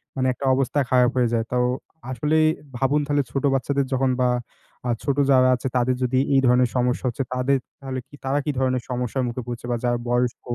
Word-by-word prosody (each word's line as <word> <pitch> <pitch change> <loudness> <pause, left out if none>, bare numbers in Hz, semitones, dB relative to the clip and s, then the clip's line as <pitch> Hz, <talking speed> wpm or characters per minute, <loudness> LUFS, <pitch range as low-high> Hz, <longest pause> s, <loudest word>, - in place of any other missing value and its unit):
মানে 130 -1 0
একটা 135 - -6
অবস্থা 135 +2 0
খারাপ 125 -1 +4
হয়ে 125 -1 +3
যায়। 115 -1 +1
তো - - -1 0.6
আসলে 150 +6 0 0.4
ভাবুন, 140 +3 +2
তাহলে 145 -1 +1
ছোট 135 +1 -2
বাচ্চাদের 140 +1 0
যখন 130 0 +2
বা 125 - +4 0.6
আ - - 0
ছোট 140 -1 0
যারা 130 -1 +5
আছে, 125 - -4
তাদের 125 +1 +2
যদি 130 +1 +1 0.2
এই 135 - +5
ধরনের 125 0 +4
সমস্যা 125 +1 0
হচ্ছে, 125 +2 -1
তাদের 130 +2 +2 0.2
তাহলে 130 -1 -5 0.3
তারা 140 +2 +1
কি 150 - +1
ধরনের 130 -2 0
সমস্যার 125 +1 -2
মুখে 120 +1 -4
পড়ছে 120 0 -6
বা - - +1
যারা 120 0 +1
বয়স্ক 120 0 0
130 Hz, 200 wpm, -23 LUFS, 125-135 Hz, 0.6 s, যারা